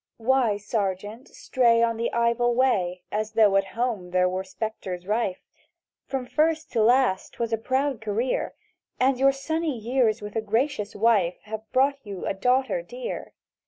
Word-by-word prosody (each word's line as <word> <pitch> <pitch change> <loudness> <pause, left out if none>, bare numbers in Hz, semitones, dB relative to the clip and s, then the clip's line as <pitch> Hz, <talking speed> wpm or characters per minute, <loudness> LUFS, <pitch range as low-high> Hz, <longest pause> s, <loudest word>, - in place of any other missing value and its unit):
"WHY, 235 -3 +2
Sergeant, 205 +3 -3
stray 235 -3 +2
on 230 -1 +1
the 230 +1 -1
Ivel 235 +1 +1
Way, 185 -9 +1
As 215 +1 -2
though 210 -3 +4
at 195 0 +3
home 230 -7 -1
there 180 0 +2
were 185 +1 -2
spectres 190 -3 -5
rife? 210 -2 -1 0.6
From 265 -2 -3
first 315 +4 0
to 230 - +1
last 240 -3 +2
'twas 230 -1 -3
a - - +2
proud 260 +1 -1
career! 225 +4 -1 0.4
And 255 0 +2
your 275 +1 +5
sunny 310 +1 -2
years 230 -1 +1
with 210 +1 -8
a 225 - +1
gracious 220 0 -1
wife 205 -5 +2
Have 220 0 -8
brought 275 +2 +2
you 200 -4 -7
a - - 0
daughter 260 - +1
dear. - - -7
230 Hz, 160 wpm, -25 LUFS, 205-260 Hz, 0.6 s, your